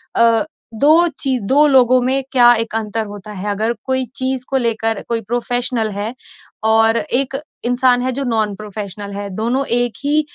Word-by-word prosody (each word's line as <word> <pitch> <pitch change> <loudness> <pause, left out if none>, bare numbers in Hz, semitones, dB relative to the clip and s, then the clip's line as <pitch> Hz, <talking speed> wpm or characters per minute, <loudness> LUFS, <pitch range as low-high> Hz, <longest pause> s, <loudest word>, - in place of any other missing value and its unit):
अ, 230 +2 +3 0.3
2 310 +9 +4
चीज़ 260 -3 0
2 280 +8 +3
लोगों 255 -2 +4
में 260 +2 +1
क्या 240 -2 +6
1 225 0 -2
अंतर 220 0 -2
होता 205 +1 -10
है। 205 +1 -5
अगर 220 +3 -1
कोई 260 -1 0
चीज़ 260 -1 -1
को 270 - 0
लेकर 225 -3 0
कोई 230 -1 0
प्रोफ़ेशनल 240 +1 -1
है, 205 +3 -4 0.5
और 225 +1 +4
एक 270 +3 0 0.3
इंसान 245 0 +2
है 255 +1 -1
जो 275 +3 -3
नॉन-प्रोफेशनल 210 -3 -4
है 200 0 -5
दोनों 240 +6 -1
1 245 -1 +3
ही 295 +2 +2
235 Hz, 170 wpm, -17 LUFS, 220-260 Hz, 0.5 s, क्या